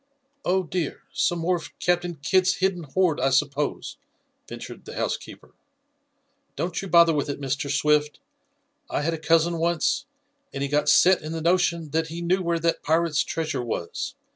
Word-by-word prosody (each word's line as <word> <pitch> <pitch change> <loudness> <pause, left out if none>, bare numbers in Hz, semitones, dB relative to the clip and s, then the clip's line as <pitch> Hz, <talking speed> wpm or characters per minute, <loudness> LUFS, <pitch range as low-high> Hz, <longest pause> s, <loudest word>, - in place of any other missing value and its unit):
"Oh, 185 +1 +1
dear! 175 -3 -3
Some 275 -11 +1
more 175 +2 +1
of 165 - -11
Captain 175 -1 0
Kidd's 185 +7 +2
hidden 185 -3 -1
hoard, 170 +2 +1
I 135 +2 +2
suppose?" 145 - -1 0.5
ventured - - -9
the - - -9
housekeeper. - - -5 1.0
"Don't 175 -1 -2
you 195 - -6
bother 170 -2 +6
with 145 -1 -1
it, 140 - -4
Mr. 140 +1 -2
Swift. 150 +1 +1 0.7
I - - -1
had 165 +2 0
a 165 - -4
cousin 165 +1 +2
once, 170 - 0 0.5
and 135 - -2
he 140 - -2
got 145 +1 +1
set 185 +1 +5
in 155 +1 -6
the 165 - -3
notion 170 -2 +1
that 160 0 0
he 165 +2 -6
knew 185 +2 +1
where 170 -1 0
that 165 0 0
pirate's 160 -1 +1
treasure 160 -5 -3
was. 110 -7 -4
165 Hz, 170 wpm, -25 LUFS, 150-175 Hz, 1.0 s, bother